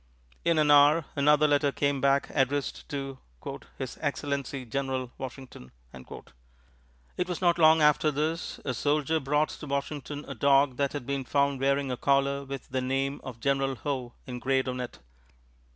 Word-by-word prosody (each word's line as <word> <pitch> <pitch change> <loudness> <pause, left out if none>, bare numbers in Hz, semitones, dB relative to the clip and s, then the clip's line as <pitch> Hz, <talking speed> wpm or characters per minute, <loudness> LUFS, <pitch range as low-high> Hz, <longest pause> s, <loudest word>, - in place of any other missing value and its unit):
In 170 -1 +2
an 150 -1 +4
hour, 145 +2 +6
another 150 +1 +4
letter 145 -1 +2
came 140 -1 0
back 140 +1 +2
addressed 140 0 -1
to 135 -2 -5 0.6
"His - - -6
Excellency, 140 -2 -3
General 130 0 -3
Washington." 130 - -9 0.2
It - - -11
was 180 - -3
not 175 -2 +2
long 160 -1 +6
after 150 +1 +4
this 155 +3 -2
a 130 - -1
soldier 150 +4 +1
brought 150 +2 +1
to 150 - -8
Washington 145 +1 -4
a 140 - -5
dog 135 +1 +3
that 140 -1 0
had 145 -4 -5
been 140 0 -2
found 140 +1 +1
wearing 140 0 +1
a 125 - -2
collar 140 +1 +1
with 135 -1 -7
the 130 0 -1
name 135 +2 -1
of 125 -3 -8
General 135 +1 0
Howe 130 -3 -4
engraved 130 +1 -1
on 125 0 -3
it. 125 -1 -6
140 Hz, 160 wpm, -28 LUFS, 130-145 Hz, 0.6 s, hour